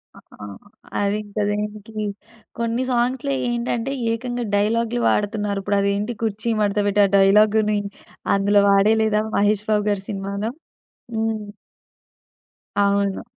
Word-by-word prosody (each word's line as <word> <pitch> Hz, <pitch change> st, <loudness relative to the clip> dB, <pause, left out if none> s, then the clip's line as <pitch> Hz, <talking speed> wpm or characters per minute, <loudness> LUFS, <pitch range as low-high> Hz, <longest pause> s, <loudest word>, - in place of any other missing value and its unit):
ఆ! -, -, -13 dB, 0.2 s
ఆ! -, -, -6 dB, 0.5 s
అది 200 Hz, 0 st, +1 dB
ఇంక 205 Hz, 0 st, -14 dB
దేనికి 210 Hz, +1 st, -4 dB, 0.6 s
కొన్ని, 235 Hz, +2 st, 0 dB
సాంగ్స్‌లో 255 Hz, +3 st, 0 dB, 0.2 s
ఏంటంటే, 240 Hz, +1 st, -2 dB, 0.2 s
ఏకంగా 240 Hz, +1 st, -3 dB
డైలాగులు 230 Hz, +3 st, +1 dB
వాడుతున్నారు. 205 Hz, -1 st, 0 dB
ఇప్పుడు 205 Hz, +1 st, +1 dB
అదేంటి 200 Hz, +3 st, 0 dB
కుర్చీ 220 Hz, +1 st, -1 dB
మడత 205 Hz, 0 st, +1 dB
బెట్టి 205 Hz, +1 st, +3 dB
ఆ -, -, +2 dB
డైలాగుని, 210 Hz, +2 st, +4 dB, 0.6 s
అందులో 200 Hz, +1 st, +3 dB
వాడేయి 200 Hz, +3 st, +4 dB
లేదా, 215 Hz, -1 st, +2 dB
'మహేష్ 205 Hz, +1 st, +2 dB
బాబు' 210 Hz, 0 st, +1 dB
గారి 200 Hz, -2 st, -1 dB
సినిమాలో. 200 Hz, +2 st, -3 dB, 0.7 s
హ్మ్. 220 Hz, -2 st, -2 dB, 1.3 s
అవును. 200 Hz, -1 st, +1 dB
210 Hz, 120 wpm, -22 LUFS, 200-225 Hz, 1.3 s, డైలాగుని